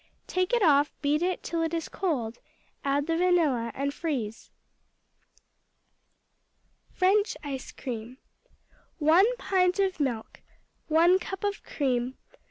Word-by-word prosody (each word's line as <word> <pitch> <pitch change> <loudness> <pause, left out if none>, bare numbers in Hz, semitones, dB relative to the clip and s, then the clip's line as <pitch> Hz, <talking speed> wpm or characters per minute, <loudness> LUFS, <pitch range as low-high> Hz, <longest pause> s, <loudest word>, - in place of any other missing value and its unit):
Take 370 0 -1
it 480 -3 +3
off, 290 -3 +4
beat 295 +2 +2
it 365 +1 -1
till 335 -1 -2
it 325 0 -1
is 330 - -3
cold, 245 - -2 0.4
add 280 +1 +1
the 330 +1 0
vanilla, 325 -10 +2
and 280 +1 -2
freeze. 255 -10 -4 2.4
French 400 +3 +2
Ice 275 -3 -5
cream 245 -1 -6 0.8
1 360 +11 +4
pint 365 -4 +1
of 385 -3 0
milk. 245 -6 -3 0.5
1 340 +4 +5
cup 380 +2 -6
of 405 0 -1
cream. 255 -3 -1
315 Hz, 120 wpm, -28 LUFS, 270-365 Hz, 2.4 s, 1